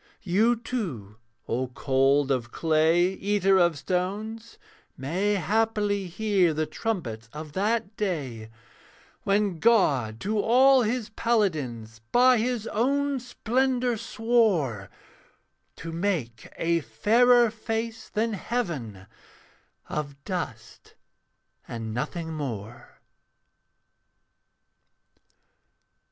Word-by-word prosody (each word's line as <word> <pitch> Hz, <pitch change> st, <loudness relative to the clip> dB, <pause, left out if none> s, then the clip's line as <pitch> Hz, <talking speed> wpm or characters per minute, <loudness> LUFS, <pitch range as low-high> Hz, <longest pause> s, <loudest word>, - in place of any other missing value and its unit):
You, 215 Hz, +6 st, +3 dB
too, 175 Hz, -, -5 dB, 0.3 s
O 125 Hz, +3 st, -1 dB
cold 135 Hz, +2 st, +2 dB
of 120 Hz, -3 st, -1 dB
clay, 165 Hz, +2 st, +3 dB
Eater 195 Hz, -1 st, +2 dB
of 170 Hz, -3 st, +3 dB
stones, 210 Hz, +7 st, -3 dB, 0.4 s
may 185 Hz, +10 st, 0 dB
haply 205 Hz, +1 st, 0 dB
hear 190 Hz, -3 st, +1 dB
The 155 Hz, +1 st, 0 dB
trumpets 150 Hz, -, -4 dB
of 150 Hz, 0 st, -8 dB
that 215 Hz, +2 st, -1 dB
day 135 Hz, -, -3 dB, 0.8 s
'When 200 Hz, -3 st, +1 dB
God 140 Hz, -, +3 dB
to 210 Hz, +2 st, -1 dB
all 260 Hz, +4 st, +5 dB
his 235 Hz, 0 st, -1 dB
paladins 150 Hz, -, -1 dB
By 250 Hz, 0 st, +5 dB
his 235 Hz, -1 st, -1 dB
own 275 Hz, +5 st, 0 dB
splendour 250 Hz, +1 st, 0 dB
swore 215 Hz, -, 0 dB, 0.9 s
To 165 Hz, -, -7 dB
make 165 Hz, -, -3 dB
a 170 Hz, 0 st, +1 dB
fairer 230 Hz, -, +4 dB
face 225 Hz, 0 st, -4 dB
than 220 Hz, +1 st, -1 dB
heaven, 160 Hz, -, -4 dB, 0.8 s
Of 145 Hz, -2 st, -4 dB
dust 135 Hz, -, -6 dB, 0.7 s
and 115 Hz, -2 st, -5 dB
nothing 160 Hz, +7 st, -4 dB
more.' 120 Hz, -7 st, -7 dB
190 Hz, 90 wpm, -26 LUFS, 140-225 Hz, 0.9 s, all